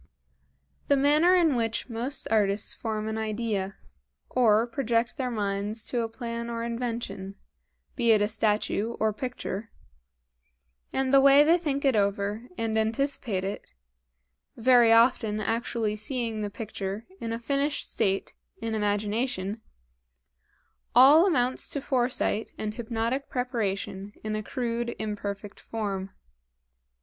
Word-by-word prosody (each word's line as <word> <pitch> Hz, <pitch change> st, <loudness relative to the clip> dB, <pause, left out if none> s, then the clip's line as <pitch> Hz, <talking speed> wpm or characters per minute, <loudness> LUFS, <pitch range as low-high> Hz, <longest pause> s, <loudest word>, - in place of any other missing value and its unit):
The 280 Hz, -, +4 dB
manner 300 Hz, +6 st, +5 dB
in 330 Hz, -6 st, +4 dB
which 230 Hz, -1 st, -1 dB
most 245 Hz, +3 st, -3 dB
artists 205 Hz, -1 st, +2 dB
form 215 Hz, -1 st, -3 dB
an 220 Hz, 0 st, -2 dB
idea, 215 Hz, -3 st, -2 dB, 0.6 s
or 225 Hz, -3 st, +4 dB
project 235 Hz, -1 st, 0 dB
their 260 Hz, -4 st, -2 dB
minds 205 Hz, 0 st, -2 dB
to 245 Hz, -, 0 dB
a 225 Hz, -, -2 dB
plan 235 Hz, 0 st, -5 dB
or 230 Hz, 0 st, -3 dB
invention, 230 Hz, -5 st, -4 dB, 0.6 s
be 235 Hz, -2 st, +1 dB
it 215 Hz, -, +5 dB
a 205 Hz, -, +2 dB
statue 215 Hz, +1 st, 0 dB
or 220 Hz, -1 st, +2 dB
picture; 225 Hz, -3 st, -5 dB, 1.2 s
and 265 Hz, 0 st, 0 dB
the 275 Hz, -, +8 dB
way 275 Hz, +1 st, +7 dB
they 335 Hz, +4 st, +4 dB
think 285 Hz, -4 st, -2 dB
it 270 Hz, -3 st, +4 dB
over 205 Hz, +3 st, 0 dB
and 220 Hz, -1 st, 0 dB
anticipate 225 Hz, -3 st, -1 dB
it 195 Hz, -, -5 dB, 0.8 s
very 240 Hz, -1 st, +5 dB
often 230 Hz, -2 st, +4 dB
actually 225 Hz, 0 st, -1 dB
seeing 225 Hz, 0 st, -3 dB
the 205 Hz, -, -2 dB
picture 205 Hz, 0 st, -5 dB
in 230 Hz, -, -4 dB
a 230 Hz, -, -1 dB
finished 280 Hz, +5 st, -1 dB
state 195 Hz, 0 st, -1 dB, 0.3 s
in 225 Hz, 0 st, -3 dB
imagination 210 Hz, 0 st, -1 dB, 1.3 s
all 290 Hz, +8 st, +8 dB
amounts 255 Hz, -8 st, +1 dB
to 285 Hz, -, -1 dB
foresight 245 Hz, -5 st, 0 dB
and 215 Hz, 0 st, -3 dB
hypnotic 235 Hz, +4 st, -2 dB
preparation 205 Hz, -5 st, -3 dB
in 215 Hz, 0 st, -2 dB
a 215 Hz, -, -2 dB
crude, 235 Hz, +1 st, -3 dB
imperfect 205 Hz, -1 st, -5 dB
form. 200 Hz, -4 st, -4 dB
225 Hz, 130 wpm, -27 LUFS, 210-250 Hz, 1.3 s, the